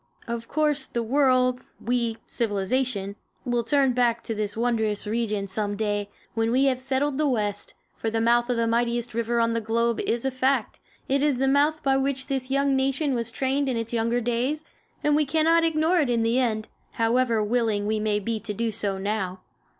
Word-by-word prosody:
Of 230 0 -4
course, 300 -2 0
the 235 - -2
world, 255 0 +2 0.2
we, 235 -1 -1
civilization, 205 -1 -1 0.3
will 240 -1 0
turn 270 +1 +2
back 235 -1 +1
to 225 - -3
this 210 -1 -3
wondrous 220 -3 0
region 210 -2 -1
some 205 +1 -2
day, 205 -1 -1 0.2
when 225 0 0
we 260 +3 +3
have 260 -2 +2
settled 265 +2 -1
the 305 - +2
West; 210 -6 -1 0.2
for 225 - -2
the 225 +1 -1
mouth 240 +1 +3
of 245 - +1
the 230 - +2
mightiest 235 +1 0
river 235 +1 0
on 230 0 +2
the 230 - -1
globe 230 +1 0
is 235 +2 -1
a 265 - +1
fact; 260 +2 0 0.3
it 275 +1 +1
is 290 -3 +2
the 270 +1 +1
mouth 290 +3 +2
by 270 -1 +3
which 270 -1 -1
this 265 -1 -3
young 275 0 +2
nation 270 +2 +1
was 235 -2 -2
trained 270 +3 0
in 250 - -1
its 230 +1 -4
younger 230 +1 +1
days, 250 +7 -1 0.4
and 295 0 +3
we 305 - +3
cannot 320 +3 +3
ignore 325 +2 +2
it 285 -5 +1
in 235 -2 +2
the 230 +3 +2
end, 220 -4 0 0.3
however 230 -1 +2
willing 215 -2 0
we 215 +1 0
may 210 -1 +1
be 220 +2 -2
to 210 -1 -5
do 230 +2 -1
so 205 -2 -1
now. 190 -2 -3
235 Hz, 200 wpm, -25 LUFS, 225-265 Hz, 0.4 s, we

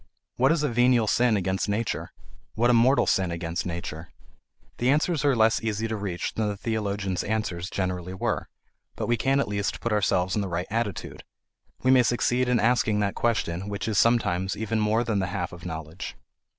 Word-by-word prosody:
What 130 +4 +4
is 165 -2 +1
a - - +2
venial 120 -1 +3
sin 120 0 +3
against 95 +1 -1
nature, 110 +3 -2 0.4
what 120 +2 +3
a - - +4
mortal 125 +4 +4
sin 95 -2 +1
against 85 +1 -3
nature? 85 -1 -6 0.7
The 125 - +2
answers 155 +2 +2
are 140 -2 +3
less 110 -1 +3
easy 110 0 -1
to 110 - -3
reach 100 -4 -3
than 110 -1 -1
the 105 -1 -3
theologians' 100 -4 -2
answers 95 -5 -2
generally 90 -1 -3
were, - - -2 0.5
but - - -3
we 120 - +2
can 135 +4 +1
at - - 0
least 100 0 -2
put 115 - -1
ourselves 95 -3 +1
in 105 - +1
the 100 - -2
right 85 +1 -2
attitude; 110 -4 -3 0.6
we 130 - +4
may 130 -1 +7
succeed 120 +1 +1
in 125 -2 +3
asking 110 -2 +2
that 100 -1 0
question 100 -5 -1
which 100 0 -4
is 105 -3 +1
sometimes 95 -6 +2
even 110 +1 -1
more 110 +2 +2
than 110 -4 0
the 95 - -1
half 90 -1 -3
of 90 0 -8
knowledge. 80 +1 -6
105 Hz, 195 wpm, -26 LUFS, 95-120 Hz, 0.7 s, may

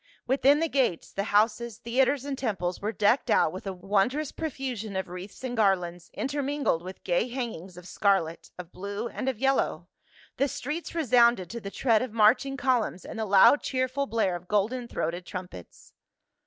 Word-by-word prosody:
Within 275 +3 +4
the 330 - +2
gates, 260 - 0
the 195 - -2
houses^ 220 +2 +1
theaters 260 +3 +1
and 285 -1 -3
temples 195 -9 -2
were 210 +2 -1
decked 215 +5 +2
out - - +4
with 190 +2 -7
a - - -1
wondrous 205 +11 0
profusion 255 -9 -4
of 190 -1 -2
wreaths 180 +6 -9
and 250 -1 -3
garlands, 180 -5 0
intermingled 280 - -1
with 185 +2 -10
gay 180 +6 +1
hangings 225 -8 -6
of 180 0 -11
scarlet, 185 -4 0
of 180 -1 -9
blue 200 +4 -5
and 265 - -3
of 260 - -3
yellow; 270 +3 0 0.5
the 275 - +2
streets 300 +6 -5
resounded 235 - +3
to 235 - -5
the 195 - -6
tread 225 +1 +2
of 250 -4 -4
marching 230 +5 +3
columns 245 -8 0
and 225 - -7
the 220 - -1
loud 200 +8 +6
cheerful 260 +1 -1
blare 220 -7 0
of 175 +1 -9
golden 225 +5 0
throated 175 -5 -3
trumpets. 180 - -9
220 Hz, 175 wpm, -27 LUFS, 190-260 Hz, 0.5 s, loud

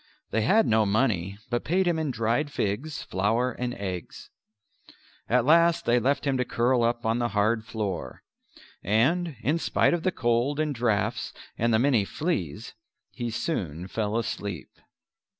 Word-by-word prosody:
They 110 - +1
had 215 - +4
no 110 0 +3
money 100 -3 0
but 120 - 0
paid 185 +3 +1
him 170 -2 +1
in 155 -2 -1
dried 120 +4 0
figs, 140 +8 -2
flour 110 +7 0
and 125 +1 -3
eggs. 95 -3 -6 1.0
At 125 0 +3
last 170 +2 +4
they 120 +1 +3
left 140 +4 0
him 135 -2 +1
to 125 - +1
curl 125 0 +1
up 120 0 0
on 115 +2 +1
the 120 - +1
hard 110 +2 +2
floor; 105 -4 -4 0.6
and 150 - +1
in 150 +7 +1
spite - - +2
of 175 - 0
the 185 - +1
cold 120 +2 0
and 155 -1 0
draughts 115 -3 -1 0.2
and 115 +1 +1
the 110 - +4
many 120 -3 +3
fleas 105 - -3 0.4
he 120 -2 -4
soon 95 - -3
fell 105 +2 -2
asleep. 100 -7 -4
120 Hz, 160 wpm, -26 LUFS, 105-145 Hz, 1.0 s, had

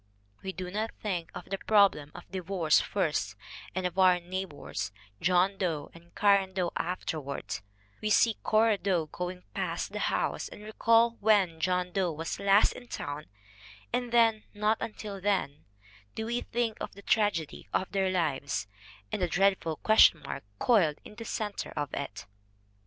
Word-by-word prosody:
We 190 - -4
do 185 -1 -6
not 215 +3 -1
think 180 -6 -3
of - - -7
the 195 - -1
problem 200 -9 +3
of 175 - -10
divorce 185 -4 +2
first 150 - -1 0.4
and 185 -1 -1
of 180 +1 -2
our 185 -1 +6
neighbors, 175 - -5 0.3
John 185 +2 +3
Doe 160 -6 -2
and 170 +1 -17
Cora 200 -2 +4
Doe, 185 -2 -2
afterward; 160 -5 -3 0.4
we 215 - -1
see 225 +1 +4
Cora 215 -1 +3
Doe 180 -5 +1
going 180 +3 -5
past - - -2
the - - -4
house - - 0
and 210 - -11
recall 230 +2 +3
when 200 -6 +3
John 180 +1 0
Doe 185 -2 +1
was 160 +1 -4
last 200 +1 +5
in 245 - -11
town 145 -7 -5 0.7
and 245 -1 -1
then, 225 -2 +4
and 210 - -14
not 215 +1 +3
until 210 -3 -5
then, 185 -8 -1 0.5
do 220 - -3
we 240 +2 -1
think 235 -2 -1
of - - -5
the 200 - -13
tragedy 195 -10 0
of 185 - -1
their 195 -2 +1
lives 145 - -1 0.5
and - - -2
the 180 - +2
dreadful 185 -3 +2
question 170 -4 +5
mark - - -5
coiled 170 - +3
in - - -11
the 230 +1 -8
center 210 -2 -3
of 145 -1 -2
it. 140 - -5
190 Hz, 165 wpm, -29 LUFS, 170-210 Hz, 0.7 s, our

